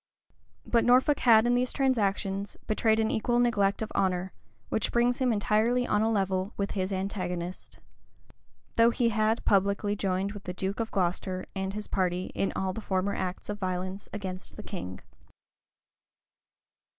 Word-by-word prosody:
But 235 Hz, -1 st, +3 dB
Norfolk 255 Hz, +4 st, +4 dB
had 225 Hz, -2 st, +6 dB
in 240 Hz, -, +3 dB
these 250 Hz, +1 st, +1 dB
transactions 200 Hz, -6 st, 0 dB
betrayed 220 Hz, +1 st, +2 dB
an 220 Hz, 0 st, +1 dB
equal 240 Hz, +2 st, +1 dB
neglect 215 Hz, -4 st, +2 dB
of 220 Hz, -, -6 dB
honor, 185 Hz, -1 st, 0 dB, 0.4 s
which 220 Hz, -, 0 dB
brings 240 Hz, +2 st, +2 dB
him 255 Hz, -2 st, +2 dB
entirely 220 Hz, +3 st, +2 dB
on 210 Hz, -3 st, +1 dB
a 220 Hz, -, +2 dB
level 195 Hz, -1 st, 0 dB
with 200 Hz, 0 st, -1 dB
his 190 Hz, -1 st, -2 dB
antagonist. 185 Hz, -2 st, -4 dB, 1.0 s
Though 230 Hz, 0 st, +6 dB
he 235 Hz, 0 st, +1 dB
had 220 Hz, +1 st, +1 dB
publicly 200 Hz, +1 st, +2 dB
joined 195 Hz, 0 st, -1 dB
with 205 Hz, -1 st, -10 dB
the 180 Hz, -, -4 dB
duke 195 Hz, +3 st, -3 dB
of 225 Hz, -1 st, -1 dB
Glocester 185 Hz, 0 st, -1 dB
and 190 Hz, +1 st, -3 dB
his 210 Hz, 0 st, -5 dB
party 180 Hz, -1 st, -1 dB
in 195 Hz, -, 0 dB
all 190 Hz, -1 st, -1 dB
the 225 Hz, -, -5 dB
former 190 Hz, 0 st, -1 dB
acts 180 Hz, 0 st, -4 dB
of 205 Hz, 0 st, -4 dB
violence 185 Hz, +1 st, -3 dB
against 190 Hz, -2 st, -5 dB
the 215 Hz, -, -8 dB
king. 95 Hz, -, -6 dB
200 Hz, 160 wpm, -28 LUFS, 190-225 Hz, 1.0 s, had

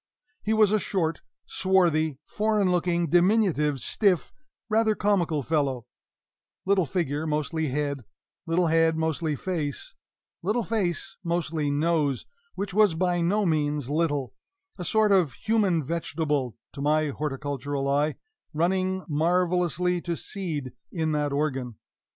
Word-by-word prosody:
He 215 Hz, -, -2 dB
was 215 Hz, -2 st, +4 dB
a 215 Hz, -, +3 dB
short, 165 Hz, -5 st, -1 dB, 0.2 s
swarthy, 165 Hz, -6 st, +2 dB
foreign 210 Hz, -3 st, +1 dB
looking, 175 Hz, -1 st, +1 dB
diminutive, 175 Hz, -6 st, +3 dB
stiff, 190 Hz, -, +1 dB, 0.3 s
rather 220 Hz, 0 st, +2 dB
comical 175 Hz, -9 st, +1 dB
fellow 135 Hz, -5 st, 0 dB, 0.8 s
little 190 Hz, -4 st, +2 dB
figure 160 Hz, -3 st, -1 dB
mostly 155 Hz, +1 st, -1 dB
head, 140 Hz, -1 st, -2 dB, 0.4 s
little 170 Hz, +2 st, +2 dB
head 165 Hz, 0 st, +3 dB
mostly 160 Hz, -1 st, -1 dB
face, 155 Hz, -3 st, -4 dB, 0.5 s
little 215 Hz, +7 st, 0 dB
face 195 Hz, -3 st, -2 dB
mostly 165 Hz, -3 st, -1 dB
nose, 145 Hz, -2 st, +1 dB, 0.3 s
which 200 Hz, -1 st, -4 dB
was 210 Hz, -4 st, +4 dB
by 175 Hz, 0 st, +1 dB
no 200 Hz, +5 st, +2 dB
means 150 Hz, -4 st, 0 dB
little 145 Hz, -5 st, 0 dB, 0.4 s
a 180 Hz, -, -6 dB
sort 215 Hz, +4 st, +2 dB
of 180 Hz, -9 st, +3 dB
human 200 Hz, -, +1 dB
vegetable 150 Hz, -5 st, -2 dB, 0.2 s
(to 140 Hz, -, -7 dB
my 155 Hz, +1 st, +2 dB
horticultural 145 Hz, -1 st, -3 dB
eye) 145 Hz, +2 st, +1 dB, 0.4 s
running 185 Hz, +3 st, 0 dB
marvelously 180 Hz, +2 st, +1 dB
to 170 Hz, -1 st, -3 dB
seed 155 Hz, -, -5 dB, 0.2 s
in 160 Hz, -2 st, -1 dB
that 150 Hz, -1 st, 0 dB
organ. 135 Hz, -5 st, -1 dB
165 Hz, 125 wpm, -26 LUFS, 150-185 Hz, 0.8 s, was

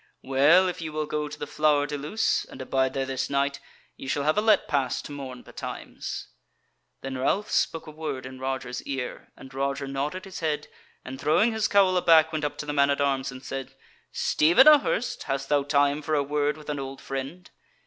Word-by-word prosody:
Well 145 Hz, +8 st, +5 dB
if 180 Hz, -1 st, -4 dB
ye 160 Hz, -, -4 dB
will 155 Hz, 0 st, -2 dB
go 150 Hz, 0 st, -2 dB
to 150 Hz, -, -8 dB
the -, -, -4 dB
Flower 150 Hz, -1 st, +2 dB
de 145 Hz, 0 st, -4 dB
Luce 150 Hz, +10 st, 0 dB
and -, -, -12 dB
abide 130 Hz, 0 st, 0 dB
there 135 Hz, -1 st, 0 dB
this 135 Hz, 0 st, -3 dB
night, 140 Hz, 0 st, 0 dB, 0.4 s
ye -, -, -9 dB
shall 140 Hz, +2 st, 0 dB
have 155 Hz, +2 st, +2 dB
a 210 Hz, -, +2 dB
let 215 Hz, -2 st, +3 dB
pass 135 Hz, -3 st, 0 dB
to -, -, -9 dB
morn 130 Hz, -3 st, -7 dB
betimes." -, -, -7 dB, 0.7 s
Then 135 Hz, -1 st, -5 dB
Ralph 200 Hz, +11 st, 0 dB
spake 165 Hz, -, 0 dB
a 155 Hz, -, -9 dB
word 150 Hz, -4 st, -5 dB
in 130 Hz, 0 st, -9 dB
Roger's 130 Hz, -1 st, -3 dB
ear, 135 Hz, -3 st, -5 dB
and 135 Hz, 0 st, -12 dB
Roger 135 Hz, +1 st, -2 dB
nodded 140 Hz, +7 st, -3 dB
his 190 Hz, -, -8 dB
head, 150 Hz, -2 st, -2 dB, 0.4 s
and, 130 Hz, +1 st, -7 dB
throwing 210 Hz, +10 st, +3 dB
his 220 Hz, -1 st, 0 dB
cowl 190 Hz, -2 st, +4 dB
aback, 160 Hz, -2 st, +5 dB
went 155 Hz, -1 st, -2 dB
up 145 Hz, -, -3 dB
to -, -, -5 dB
the 145 Hz, -, -3 dB
man 140 Hz, -1 st, +3 dB
at 140 Hz, -, +1 dB
arms 135 Hz, -2 st, 0 dB
and 130 Hz, +1 st, -10 dB
said: 135 Hz, -1 st, -6 dB, 0.4 s
"Stephen 175 Hz, -, +4 dB
a 305 Hz, -1 st, +10 dB
Hurst, 250 Hz, -3 st, -2 dB
hast 135 Hz, -1 st, -3 dB
thou 145 Hz, -1 st, +3 dB
time 145 Hz, +1 st, +2 dB
for 155 Hz, +1 st, -1 dB
a 145 Hz, -, +2 dB
word 145 Hz, +1 st, 0 dB
with 150 Hz, -1 st, -6 dB
an 145 Hz, -, -3 dB
old 135 Hz, 0 st, -6 dB
friend?" 135 Hz, +7 st, -6 dB
145 Hz, 215 wpm, -26 LUFS, 135-155 Hz, 0.7 s, a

